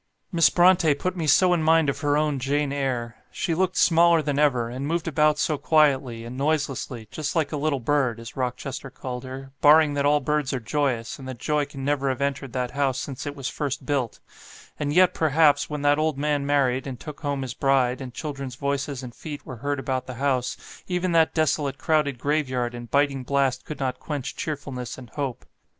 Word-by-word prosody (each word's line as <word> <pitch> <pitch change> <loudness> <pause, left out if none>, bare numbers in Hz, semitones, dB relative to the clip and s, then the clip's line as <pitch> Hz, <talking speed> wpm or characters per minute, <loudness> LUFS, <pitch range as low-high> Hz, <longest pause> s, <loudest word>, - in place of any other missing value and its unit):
"Miss 170 -3 +5
Brontë 175 -4 +4
put 185 +5 -2
me 165 -3 -2
so 180 +5 +5
in 170 - +1
mind 160 0 +4
of 140 0 -1
her 145 0 +1
own 150 -2 0
'Jane 140 +2 0
Eyre.' 125 -4 -2
She 170 - -2
looked 185 +2 0
smaller 170 -1 +5
than 145 -1 -1
ever, 130 -6 +2
and 130 +4 -4
moved 170 +1 -1
about 150 -1 +3
so 155 -1 0
quietly, 135 -7 +2
and 120 +2 -7
noiselessly, 135 -5 -2
just 150 -2 -3
like 160 -3 +1
a - - -2
little 145 -1 0
bird, 125 -2 +1
as 115 -1 -10
Rochester 130 +1 -4
called 125 -1 -6
her, 135 +1 -8
barring 150 0 +6
that 140 0 0
all 150 0 +4
birds 150 -1 -1
are 130 - -1
joyous, 125 -1 -1
and 130 - -9
that 130 -2 -6
joy 150 +3 0
can 135 -2 -8
never 140 -1 +1
have 130 - -2
entered 140 -1 -2
that 125 -1 -2
house 135 -1 0
since 140 0 -5
it 145 - -4
was 135 -3 -4
first 140 -2 -3
built; 130 -5 -1 0.6
and 145 -1 -1
yet, 180 +3 +5
perhaps, 155 -1 +3
when 150 -1 -4
that 145 +1 +4
old 155 -2 0
man 145 -1 0
married, 135 -2 +1
and 130 -3 -6
took 150 -2 -8
home 140 -3 -2
his 125 -2 -5
bride, 130 -1 +1
and 130 -2 -6
children's 135 -4 -5
voices 140 -1 -2
and 120 -2 -8
feet 150 +2 -8
were 130 - -7
heard 145 +5 -2
about 130 -1 -2
the 130 - -6
house, 130 -1 0 0.3
even 180 0 -1
that 165 -1 +3
desolate 145 -3 +1
crowded 150 -4 +1
grave 145 +2 0
yard 120 -2 -1
and 120 -1 -8
biting 140 -1 +2
blast 135 -1 0
could 155 - -7
not 130 -2 -2
quench 145 -4 -4
cheerfulness 135 -5 -5
and 125 -3 -12
hope. 140 -4 -4
140 Hz, 210 wpm, -25 LUFS, 130-150 Hz, 0.6 s, barring